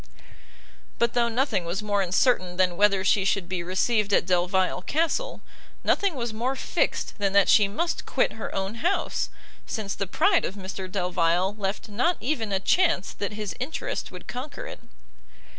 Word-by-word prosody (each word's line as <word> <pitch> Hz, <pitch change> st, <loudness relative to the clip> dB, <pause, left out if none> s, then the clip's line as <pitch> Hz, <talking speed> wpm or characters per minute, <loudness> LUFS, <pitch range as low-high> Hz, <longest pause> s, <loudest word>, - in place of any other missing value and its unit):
But 235 Hz, 0 st, +1 dB
though 235 Hz, -1 st, +2 dB
nothing 230 Hz, -5 st, 0 dB
was 175 Hz, +5 st, -3 dB
more 205 Hz, -1 st, +1 dB
uncertain 185 Hz, -1 st, +2 dB
than 185 Hz, -2 st, +2 dB
whether 200 Hz, 0 st, +3 dB
she 200 Hz, 0 st, +3 dB
should 195 Hz, -2 st, 0 dB
be 180 Hz, -1 st, -2 dB
received 200 Hz, +4 st, +1 dB
at -, -, +3 dB
Delvile 180 Hz, +1 st, +1 dB
Castle, 330 Hz, -, -1 dB, 0.4 s
nothing 395 Hz, -5 st, +2 dB
was 235 Hz, -3 st, -3 dB
more 245 Hz, +5 st, -1 dB
fixed 260 Hz, -, -1 dB
than 200 Hz, -1 st, +1 dB
that 200 Hz, -1 st, +5 dB
she 210 Hz, -2 st, +6 dB
must 335 Hz, +13 st, -2 dB
quit -, -, +1 dB
her -, -, -6 dB
own 195 Hz, +1 st, -2 dB
house, 375 Hz, +3 st, 0 dB, 0.4 s
since 210 Hz, -4 st, -3 dB
the 195 Hz, -, -3 dB
pride 370 Hz, -, +3 dB
of 195 Hz, -, -3 dB
Mr 190 Hz, -1 st, -6 dB
Delvile 180 Hz, 0 st, +1 dB
left 200 Hz, -1 st, -3 dB
not 245 Hz, +12 st, +1 dB
even 235 Hz, -6 st, -2 dB
a 195 Hz, -, +1 dB
chance 335 Hz, -, +2 dB
that 205 Hz, +1 st, -4 dB
his 210 Hz, -4 st, -4 dB
interest 265 Hz, +6 st, -3 dB
would -, -, -10 dB
conquer 285 Hz, -, -6 dB
it. -, -, -8 dB
205 Hz, 170 wpm, -26 LUFS, 190-245 Hz, 0.4 s, she